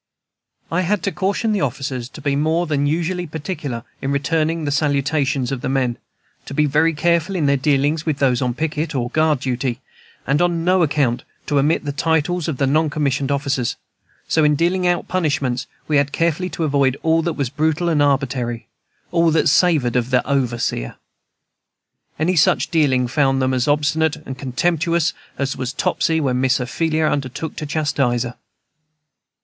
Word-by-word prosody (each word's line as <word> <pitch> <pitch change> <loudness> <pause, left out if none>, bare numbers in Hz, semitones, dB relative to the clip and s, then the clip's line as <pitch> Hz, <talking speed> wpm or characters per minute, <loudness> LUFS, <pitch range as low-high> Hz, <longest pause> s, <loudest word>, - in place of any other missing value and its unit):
I 170 +2 +1
had 190 +1 0
to 195 - 0
caution 200 +6 -1
the 205 -3 0
officers 130 -2 -3
to - - -11
be 140 0 0
more 160 +4 +1
than 145 -3 0
usually 175 +3 -1
particular 145 -6 -5 0.2
in 135 - -2
returning 160 +3 0
the 145 - -1
salutations 140 -2 0
of 135 -3 -3
the - - -2
men; 130 -3 0 0.5
to 140 - -6
be 150 - +3
very 155 +3 +2
careful 170 +4 +1
in 165 -5 0
their 140 0 +3
dealings 145 +3 +1
with 155 -4 -1
those 130 -3 +2
on 125 -2 -1
picket 155 0 -2
or 120 -1 -2
guard 155 -4 +2
duty; 125 -1 -2 0.5
and 140 +4 +1
on 170 -1 +1
no 185 0 +3
account 145 -6 +1 0.2
to 145 - +1
omit 150 +3 +1
the 145 - -1
titles 160 +3 0
of 155 -5 -2
the 135 - +1
non 155 +3 +2
commissioned 140 -2 -1
officers. 140 -3 -1 0.5
So, 160 - +2
in 150 0 +4
dealing 180 +4 +1
out 175 -1 0
punishments, 140 -7 -1 0.2
we 150 - +2
had 140 0 +1
carefully 170 +3 0
to 165 - -4
avoid 140 -3 +2
all 165 0 +3
that 170 0 -1
was 135 -4 -2
brutal 160 +3 0
and 160 -3 +2
arbitrary, 130 -4 0 0.5
all 170 -1 +3
that 160 -2 +3
savored 150 -7 +3
of 125 0 +1
the 125 -1 +1
overseer. 120 - -1 1.2
Any 175 +4 +1
such 155 - +3
dealing 135 -7 +2
found 135 0 +2
them 130 0 +1
as 125 -1 0
obstinate 150 +1 +2
and 130 - -6
contemptuous 165 +6 0 0.2
as 140 -1 -1
was 130 -1 -3
Topsy 160 +3 0
when 130 -4 0
Miss 130 0 +2
Ophelia 155 +5 0
undertook 145 +1 -2
to 150 - -4
chastise 140 -5 0
her. 120 0 -6
145 Hz, 175 wpm, -20 LUFS, 135-160 Hz, 1.2 s, in